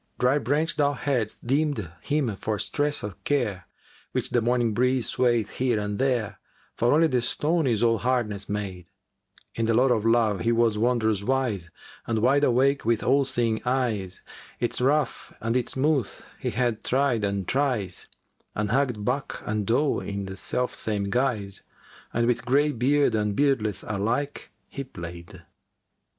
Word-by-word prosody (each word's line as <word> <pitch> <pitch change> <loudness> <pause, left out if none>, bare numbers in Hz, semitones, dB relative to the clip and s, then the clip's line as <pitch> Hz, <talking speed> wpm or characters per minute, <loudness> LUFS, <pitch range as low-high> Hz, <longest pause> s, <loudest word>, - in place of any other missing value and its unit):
[FN#385] - - -39
Dry 125 +3 +3
branch 145 +6 0
thou 145 -1 +3
hadst 125 -6 -2
deemed 135 - 0
him 140 -8 0
for 110 +1 -2
stress 145 +7 -1
o' 105 -1 -4
care, 105 - -1 0.2
* - - -28
Which - - -1
the 120 - +2
morning 120 -1 +1
breeze 125 +1 +2
swayeth 120 -4 +1
here 125 -4 +1
and 105 0 -3
there, 120 -7 0 0.3
For 120 - +1
only 160 +3 +5
the 130 -6 +1
stone 155 +5 0
is 115 -2 +1
all 115 -2 +3
hardness 110 -5 -1
made! 95 -4 -4 0.7
In 115 -1 -1
the 115 - +2
lore 125 +2 +4
of 110 -3 -1
Love 115 -3 +3
he 115 +5 +1
was 115 -2 +3
wondrous 110 -2 +1
wise 110 -7 -1 0.2
* - - -21
And 115 - 0
wide 130 +6 +3
awake 135 +2 +3
with 115 -1 +1
all 135 +2 +3
seeing 115 -4 0
eyes. 115 -8 -1 0.4
Its 120 +1 -1
rough 145 +3 0
and 115 +2 -1
its 125 -2 0
smooth 135 -4 +1 0.3
he - - -2
had 120 -2 -1
tried 130 -4 +1
and 100 -2 -1
tries 125 -10 -1 0.2
* - - -43
And 105 0 -1
hugged 125 -5 0
buck 135 +3 -2
and 105 -2 -2
doe 135 +5 +2
in 100 -1 -4
the 95 0 -6
self 125 +6 -2
same 100 -2 -2
guise 115 -6 -1 0.5
And 120 0 +1
with 120 0 +1
greybeard 140 0 +2
and 105 -2 0
beardless 120 -8 +1
alike 115 +8 -2 0.2
he 140 - -6
play'd." 85 -8 -9
120 Hz, 170 wpm, -26 LUFS, 105-135 Hz, 0.7 s, only